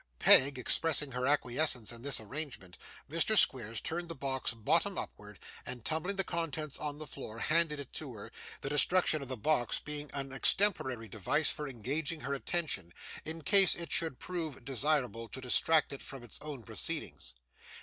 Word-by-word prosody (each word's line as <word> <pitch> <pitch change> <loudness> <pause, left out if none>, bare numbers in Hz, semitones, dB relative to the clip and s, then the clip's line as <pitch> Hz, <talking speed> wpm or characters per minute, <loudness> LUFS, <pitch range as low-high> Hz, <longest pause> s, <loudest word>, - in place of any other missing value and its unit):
Peg, 135 - +7
expressing 150 +2 +1
her 125 0 -2
acquiescence 130 -3 +2
in 120 -1 -7
this 140 +1 -1
arrangement, 110 - -4 0.3
Mr. 165 +8 +2
Squeers 115 - +3
turned 170 +1 -4
the 165 - -5
box 135 -1 -2
bottom 115 -2 +1
upwards, - - -8 0.2
and 125 -2 -7
tumbling 160 +5 -1
the 195 - +1
contents 160 -4 -3
upon 145 -1 -4
the 155 - -5
floor, 130 -5 -8
handed 155 +2 +1
it 140 - -9
to 135 -6 -7
her; 100 - -10 0.3
the 135 - -3
destruction 155 +1 +3
of 140 - -5
the 130 0 -3
box 120 0 +1
being 150 0 -4
an 135 -1 -4
extemporary 135 - +1
device 125 - +1
for 150 -1 -5
engaging 140 +6 -3
her 140 +3 -3
attention, 140 - -1 0.3
in 160 0 -5
case 195 +1 +6
it 170 -1 -6
should 160 -6 +2
prove 160 -8 -5
desirable 130 -4 0
to - - -6
distract 140 +4 +3
it 140 - -7
from 135 -3 -9
his 120 - -9
own 145 -5 -7
proceedings. - - -2
140 Hz, 170 wpm, -32 LUFS, 125-160 Hz, 0.3 s, Peg